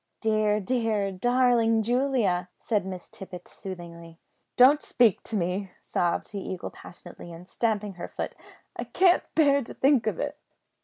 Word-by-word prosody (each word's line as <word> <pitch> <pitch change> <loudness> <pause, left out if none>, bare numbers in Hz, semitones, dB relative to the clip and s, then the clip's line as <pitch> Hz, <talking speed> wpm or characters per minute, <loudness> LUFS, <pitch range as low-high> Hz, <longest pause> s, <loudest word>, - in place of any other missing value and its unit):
"Dear, 215 -1 +2
dear, 215 -2 0
darling 235 +1 +2
Julia!" 235 -7 +1
said 210 -5 -1
Miss 185 -2 -7
Tippet 185 -2 -10
soothingly. 170 -3 -9 0.4
"Don't 275 +4 +7
speak 230 -6 +3
to 225 - -3
me!" 185 +1 -1
sobbed 175 -1 -1
the 205 - -4
Eagle 185 -1 -5
passionately, 175 0 -12
and 170 +2 -11
stamping 210 -3 -1
her 175 - -7
foot; - - -5 0.4
"I - - -4
can't 365 -1 +4
bear 280 -3 +4
to 245 - -9
think 270 -3 +3
of - - 0
it." - - -3
210 Hz, 150 wpm, -27 LUFS, 180-245 Hz, 0.4 s, Don't